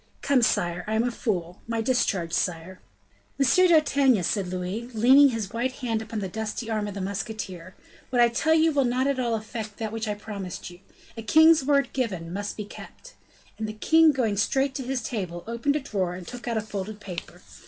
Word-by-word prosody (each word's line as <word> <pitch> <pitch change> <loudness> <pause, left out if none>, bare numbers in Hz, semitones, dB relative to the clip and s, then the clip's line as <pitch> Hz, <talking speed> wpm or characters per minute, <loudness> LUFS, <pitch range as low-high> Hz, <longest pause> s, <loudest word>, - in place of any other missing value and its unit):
Come, 275 -2 +3
sire, 175 -5 +1
I 215 - -1
am 220 - +2
a 245 - 0
fool! 180 -7 -3
My 230 0 -2
discharge, 215 -8 0
sire!" 180 +1 -2 0.6
"Monsieur 280 +7 +4
d'Artagnan," 280 - +4
said 195 +1 0
Louis, 185 +6 -4
leaning 265 +6 +7
his 220 -5 -4
white 250 +3 -1
hand 235 -5 -2
upon 220 0 -6
the 195 - -2
dusty 220 +3 -4
arm 215 -1 -1
of 205 - -6
the 200 - -4
musketeer, 190 -2 -5 0.3
"what 250 - 0
I 240 - +7
tell 310 +7 +2
you 320 0 +4
will 285 -2 +2
not 250 +1 +1
at 275 -1 0
all 235 -2 0
affect 215 -1 -6
that 220 -2 -4
which 225 0 -4
I 210 - -1
promised 200 -4 -7
you. 175 - -14 0.4
A 225 - -6
king's 315 +7 +6
word 280 0 +2
given 185 -10 -3
must 205 +1 -4
be 210 - -4
kept." - - -12 0.5
And 220 - -2
the - - -5
king 320 +8 +5
going 230 -7 0
straight 270 +6 +1
to 265 - -4
his 255 -1 -3
table, 180 -7 -4
opened 235 +5 -1
a - - +1
drawer, 190 -10 -2
and 180 -1 -9
took 245 0 -8
out 230 -2 0
a - - +1
folded 210 0 -6
paper. 185 -4 -8
220 Hz, 210 wpm, -26 LUFS, 195-255 Hz, 0.6 s, leaning